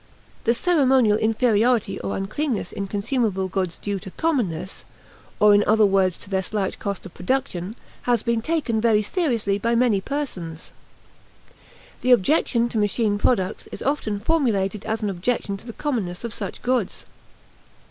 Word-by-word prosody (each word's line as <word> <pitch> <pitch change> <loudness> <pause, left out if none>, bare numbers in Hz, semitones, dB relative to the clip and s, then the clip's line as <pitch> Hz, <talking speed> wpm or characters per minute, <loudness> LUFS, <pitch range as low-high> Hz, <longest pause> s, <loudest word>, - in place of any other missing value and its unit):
The 235 +1 +3
ceremonial 260 -9 +3
inferiority 225 -1 +2
or - - -3
uncleanness 220 +6 -2
in 200 - -4
consumable 205 -2 -1
goods 185 -3 -2
due 200 -1 -3
to 190 - -9
"commonness," 190 - -2 0.6
or 210 0 +7
in 205 0 +5
other 220 0 +5
words 190 -3 +2
to - - -10
their 190 -1 +1
slight 195 0 -2
cost 200 -2 -4
of 190 - -10
production, 200 -2 -2 0.3
has 235 -3 +2
been 235 -1 0
taken 265 -6 0
very 215 -2 +3
seriously 230 - 0
by 235 +3 +1
many 230 -5 +3
persons. 190 - -5 1.3
The 250 0 +5
objection 240 - +2
to 225 - -1
machine 205 0 +1
products 190 -5 0
is - - -7
often 225 -7 -1
formulated 210 -7 0
as 220 0 -2
an 205 - 0
objection 200 +2 -1
to 215 - -14
the - - -5
commonness 215 -12 -3
of 235 -2 -4
such 200 -3 -6
goods. 245 -6 -1
215 Hz, 155 wpm, -23 LUFS, 195-245 Hz, 1.3 s, or